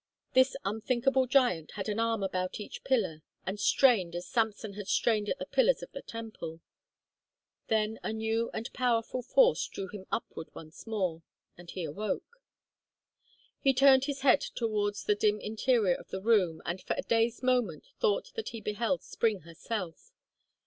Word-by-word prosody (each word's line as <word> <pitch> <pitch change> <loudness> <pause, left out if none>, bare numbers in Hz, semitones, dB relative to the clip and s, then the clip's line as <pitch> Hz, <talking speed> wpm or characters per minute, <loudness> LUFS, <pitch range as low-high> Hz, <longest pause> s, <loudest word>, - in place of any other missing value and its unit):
This 260 +1 +4
unthinkable 255 +5 +1
giant 245 - +2
had 195 -1 -4
an 210 +1 -1
arm 230 -2 +1
about 185 0 -2
each 210 - -8
pillar 190 -12 0 0.2
and 195 +2 -3
strained 205 -9 +4
as 175 +1 -4
Samson 220 -2 -1
had 205 -1 -7
strained 210 -2 +2
at - - -1
the - - -5
pillars - - +2
of - - -9
the - - -7
temple. 215 -8 -7 1.1
Then 220 0 0
a - - -3
new 220 +1 -1
and 225 - -5
powerful 245 0 0
force - - +3
drew 190 - -6
him 190 -1 -9
upward 195 -7 -4
once 160 +6 -11
more, 185 -7 -1 0.3
and 175 0 -13
he 185 - -5
awoke. 215 - -4 1.2
He 270 -2 +3
turned 270 0 +6
his 280 -1 -3
head 265 -2 +5
towards 210 -3 -2
the 210 - +3
dim 210 0 +1
interior 220 -2 +2
of - - -8
the 190 - -4
room 195 -8 +2
and 175 +2 -3
for - - -2
a - - -2
dazed 230 +2 +1
moment 245 -11 +1
thought 465 +1 +1
that 450 - -4
he 230 - -7
beheld 225 +5 -1
Spring 220 -4 0
herself. 170 +2 -6
220 Hz, 165 wpm, -30 LUFS, 190-250 Hz, 1.2 s, turned